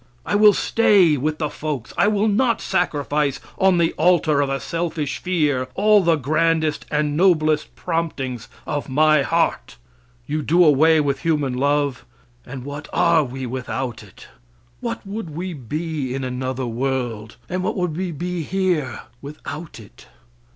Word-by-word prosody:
I - - -2
will 210 0 +7
stay 195 -9 +4
with 150 +3 -1
the 155 - -1
folks. 145 -6 -5
I - - +3
will 210 0 +2
not 230 +3 +2
sacrifice 150 -6 0 0.2
on 190 -2 +4
the 170 -1 +2
altar 160 -3 +3
of 140 - 0
a 135 0 -1
selfish 165 -3 -3
fear 150 -8 0
all 210 +1 +5
the 170 -2 +3
grandest 155 +2 0
and 150 -1 0
noblest 155 -3 +2
promptings 150 -8 -3 0.2
of 145 -1 -3
my 155 +2 +4
heart. 165 - 0 0.5
You 155 +1 -2
do 170 +5 +4
away 155 +2 +5
with 140 -2 -1
human 150 -6 0
love, 140 0 0 0.4
and 130 0 -7
what 145 +1 -7
are 170 -2 +3
we 130 0 -6
without 130 -1 -4
it? - - -15 0.5
What - - -5
would 200 -2 -5
we 180 +2 -4
be 145 0 -4
in 135 - -3
another 130 0 -3
world, 120 -3 -3
and 185 0 -2
what 185 - -2
would 180 -4 -1
we 180 +1 -3
be 175 +2 -4
here 175 -6 -1 0.2
without 150 0 -8
it? 105 - -16
155 Hz, 155 wpm, -21 LUFS, 135-175 Hz, 0.5 s, will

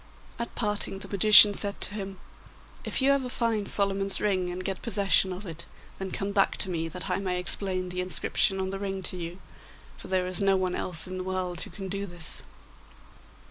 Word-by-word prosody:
At 235 - -5
parting 210 -3 +1
the 195 0 -7
magician 210 +1 +8
said 200 0 -2
to - - 0
him. 195 -2 -6 0.7
'If - - -1
you 275 - +5
ever 270 -2 0
find 230 -5 -1
Solomon's 195 -1 +2
ring 185 -4 0
and 180 +1 -6
get 195 -1 -3
possession 200 -4 +2
of 185 +3 -7
it, 170 -2 -8 0.3
then 190 0 -4
come 195 +2 -3
back 200 -1 +2
to 190 - 0
me, 165 -1 -2
that 180 +3 -6
I 180 -1 0
may 185 -2 -2
explain 185 0 -3
the 180 0 -3
inscription 190 +2 +1
on 190 0 -2
the 195 - -5
ring 195 -1 -4
to 180 - -2
you, 170 0 -6 0.6
for - - -11
there 185 -1 0
is 185 +1 -2
no 195 -1 +3
one 185 -1 -1
else 170 -4 -2
in 185 0 -6
the - - -3
world 185 -2 -2
who - - -4
can 195 -2 -7
do 200 +1 -4
this. 175 -3 -1
190 Hz, 210 wpm, -27 LUFS, 180-200 Hz, 0.7 s, magician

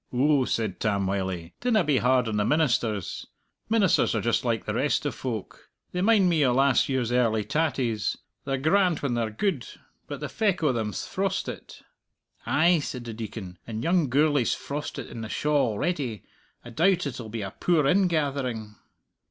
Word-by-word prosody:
"Ou," 135 +1 +2
said 110 -5 -2
Tam 100 -3 0
Wylie, 95 -3 -3
"dinna 230 -5 +3
be 150 -4 +2
hard 125 -1 +2
on 110 -1 -1
the 105 - +2
ministers. 120 - 0 0.4
Ministers 210 - +3
are 110 - 0
just 115 +3 +1
like 115 -2 -1
the - - -2
rest 145 +3 0
o' 145 - 0
folk. 115 -4 -6 0.2
They 180 - -2
mind 205 -2 +4
me 165 -4 +3
o' 130 - +3
last 135 +1 +3
year's 130 -3 0
early 115 -3 +2
tatties. 125 -6 -1 0.3
They're 135 -1 -1
grand 175 +4 +2
when 135 -4 0
they're 115 -2 0
gude, 135 - -2 0.4
but - - -6
the - - -4
feck 200 -6 0
o' 150 - +4
them's 110 -4 -3
frostit." - - -4 0.6
"Ay," 170 +2 +4
said 125 -4 -5
the 115 - -5
Deacon, 105 -5 -7
"and 110 0 -4
young 170 -3 +2
Gourlay's 145 -1 +2
frostit 145 +1 -5
in 115 - -8
the 110 - -6
shaw 145 -1 +1
already. 130 - -2 0.4
I 120 - -9
doubt 175 +6 +2
it'll 120 -5 -5
be 110 -1 -4
a 95 - -5
poor 165 -5 +2
ingathering." 140 - 0
130 Hz, 175 wpm, -26 LUFS, 110-155 Hz, 0.6 s, mind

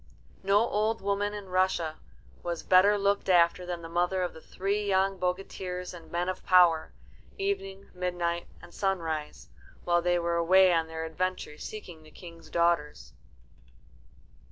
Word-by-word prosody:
No 195 +2 +3
old 215 +1 0
woman 200 +1 -1
in 200 -2 -8
Russia 185 -4 0 0.4
was 170 -1 -4
better 195 +3 +5
looked 200 0 0
after 175 0 +3
than 175 -1 -5
the - - -6
mother 180 +2 0
of 180 - -3
the 160 - -12
three 200 +5 -2
young 195 -1 +1
bogatirs 180 0 -3
and 165 -2 -12
men 175 +1 -1
of 185 0 -4
power, 175 -4 +4 0.5
Evening, 200 - -3
Midnight, 175 -1 -2 0.2
and 175 - -13
Sunrise, 165 -6 -3 0.3
while 175 0 +2
they 175 0 +2
were 170 0 0
away 185 +2 +5
on 165 -1 +1
their 160 0 -5
adventure 160 -2 -3
seeking 180 -7 -8
the 155 - -16
King's 170 0 -13
daughters. 150 - 0
180 Hz, 150 wpm, -28 LUFS, 170-195 Hz, 0.5 s, better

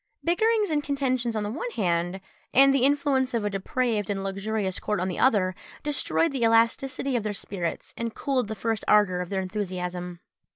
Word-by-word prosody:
Bickerings 425 +3 +2
and 295 -1 +1
contentions 255 -5 -1
on 215 - -1
the 205 - -3
one 340 - -4
hand, 175 -1 0 0.3
and 275 +1 +7
the 270 -2 +3
influence 275 -3 +2
of 220 -3 0
a 205 - -1
depraved 210 +1 -1
and 195 -1 -2
luxurious 195 0 -2
court 210 -2 -1
on 185 +1 -1
the 180 - -4
other, 200 -8 +3 0.3
destroyed 295 +3 +1
the 270 -3 -3
elasticity 235 +4 +2
of 240 - +1
their 210 0 -3
spirits, 185 -4 -4
and 230 -1 -4
cooled 260 -5 0
the 220 - -4
first 225 -1 -2
ardour 200 -4 +4
of 180 - -5
their 195 -1 -1
enthusiasm. 180 -3 -4
220 Hz, 190 wpm, -26 LUFS, 195-265 Hz, 0.3 s, and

